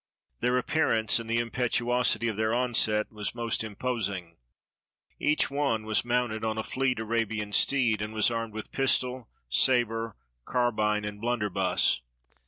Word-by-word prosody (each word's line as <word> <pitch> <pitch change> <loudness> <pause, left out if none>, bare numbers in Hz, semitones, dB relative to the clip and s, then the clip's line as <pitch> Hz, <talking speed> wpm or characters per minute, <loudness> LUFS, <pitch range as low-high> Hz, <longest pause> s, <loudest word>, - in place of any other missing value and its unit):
Their 125 +1 +2
appearance 120 -5 +2
and 115 -1 -7
the 115 - +1
impetuosity 120 -1 +1
of 110 - -1
their 110 +2 0
onset 115 -4 +1
was 105 0 -4
most 115 -1 -1
imposing. 100 -6 -3 0.8
Each 150 -2 +1
one 140 -6 0
was 110 0 +1
mounted 120 -2 -1
on 110 0 -1
a 110 - -1
fleet 130 0 -1
Arabian 110 -2 -2
steed, 120 -6 +3
and 105 +1 -3
was 110 +2 +3
armed 115 -2 -3
with 110 - -6
pistol, 130 -2 0 0.2
saber, 115 - +1 0.3
carbine, 105 - 0
and 105 0 -6
blunderbuss. 105 - +1
115 Hz, 140 wpm, -28 LUFS, 105-125 Hz, 0.8 s, steed